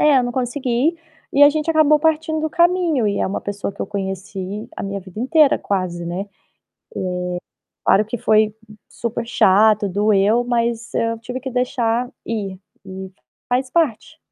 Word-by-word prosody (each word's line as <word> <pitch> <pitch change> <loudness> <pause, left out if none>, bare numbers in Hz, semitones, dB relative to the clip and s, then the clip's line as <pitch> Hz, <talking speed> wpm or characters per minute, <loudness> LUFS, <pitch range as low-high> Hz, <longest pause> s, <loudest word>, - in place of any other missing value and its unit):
é, 295 -3 +5
eu 255 - +2
não 245 - -2
consegui 255 +4 0 0.4
e 280 - +4
a 290 - +9
gente 305 +1 -3
acabou 305 -1 +5
partindo 315 0 0
o - - -5
caminho. 340 -8 +2
E 200 -1 0
é - - +1
uma 195 - -3
pessoa 200 0 -4
que - - -13
eu - - -4
conheci 195 0 -5
a - - -5
minha 200 0 -4
vida 190 +2 -12
inteira 285 +4 +4
quase, 180 -3 -2
né. 175 +3 -3
Eh, 205 - -12 1.6
claro 205 +2 +4
que 220 +3 -4
foi 215 0 +3 0.3
super 235 0 -4
chato, 210 -1 +4
doeu, 210 +4 +3
mas 235 -1 -1
eu 230 0 0
tive 245 +3 -6
que 265 +1 -5
deixar 245 -1 0 0.2
ir. 200 -5 -4 0.3
E 190 0 -8 0.4
faz 255 +1 0
parte. 315 -1 0
230 Hz, 170 wpm, -20 LUFS, 200-275 Hz, 1.6 s, a